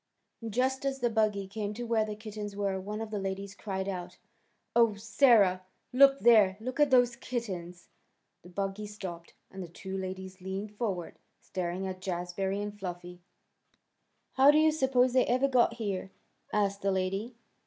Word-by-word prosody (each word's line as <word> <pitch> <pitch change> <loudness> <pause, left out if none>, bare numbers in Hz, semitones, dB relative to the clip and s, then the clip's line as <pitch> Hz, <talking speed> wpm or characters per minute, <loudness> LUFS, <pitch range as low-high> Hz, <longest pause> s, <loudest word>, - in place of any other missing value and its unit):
Just 260 +4 0
as 275 -1 -1
the 240 -2 +1
buggy 215 -3 +1
came 210 +1 -4
to 240 - -5
where 230 -2 +2
the 215 -1 -4
kittens 210 -1 -7
were 200 -1 -1
one 210 +3 -5
of 220 -1 -5
the 210 - -2
ladies 195 0 -4
cried 195 -2 -4
out, 180 -1 -5 0.6
"Oh, 230 -3 +5
Sarah! 205 -3 +4 0.3
Look 275 +1 +6
there! 210 -5 +6
Look 255 +5 -5
at 295 -1 +5
those 245 -2 +4
kittens." 185 -9 -5 0.5
The 175 - -14
buggy 195 +3 -3
stopped, 185 -5 -8 0.2
and 190 - -7
the 180 - -6
two 190 +3 -7
ladies 190 0 -6
leaned 195 +3 -5
forward, 195 -7 -3 0.2
staring 180 +1 -4
at 185 -1 -5
Jazbury 185 +2 -2
and 205 0 -5
Fluffy. 180 -1 -7 1.1
"How 270 +2 +6
do 295 - +6
you 315 0 +5
suppose 260 -4 +2
they 255 - +4
ever 255 +3 +3
got 245 -3 +3
here?" 200 -4 -3 0.4
asked 200 -1 0
the 195 - +1
lady. 195 +5 -2
205 Hz, 165 wpm, -30 LUFS, 190-235 Hz, 1.1 s, Look